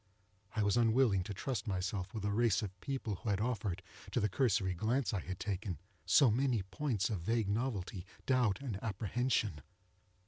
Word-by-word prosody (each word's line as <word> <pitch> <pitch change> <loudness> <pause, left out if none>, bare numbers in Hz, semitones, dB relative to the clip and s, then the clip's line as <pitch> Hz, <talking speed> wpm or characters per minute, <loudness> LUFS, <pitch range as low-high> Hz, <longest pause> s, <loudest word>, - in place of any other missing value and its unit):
I 110 - +2
was 100 +3 +3
unwilling 115 -3 +4
to 105 - -5
trust 125 +2 -3
myself 95 0 -2
with 110 -4 -4
a 105 - +1
race 110 -1 +3
of 95 -2 -6
people 130 -8 -2
who 110 - -4
had 100 -1 +1
offered, 105 -6 -1 0.3
to - - +1
the 105 - +2
cursory 95 -5 +2
glance 115 +9 0
I 100 - +1
had 95 +1 -6
taken, 100 -3 -2 0.3
so 130 -5 +6
many 120 -3 +2
points 105 +2 -1
of 100 -6 -2
vague 115 +3 +1
novelty, 100 -5 -2 0.2
doubt, 125 -5 +2
and 110 -8 -4
apprehension. 110 - 0
105 Hz, 175 wpm, -35 LUFS, 95-120 Hz, 0.3 s, so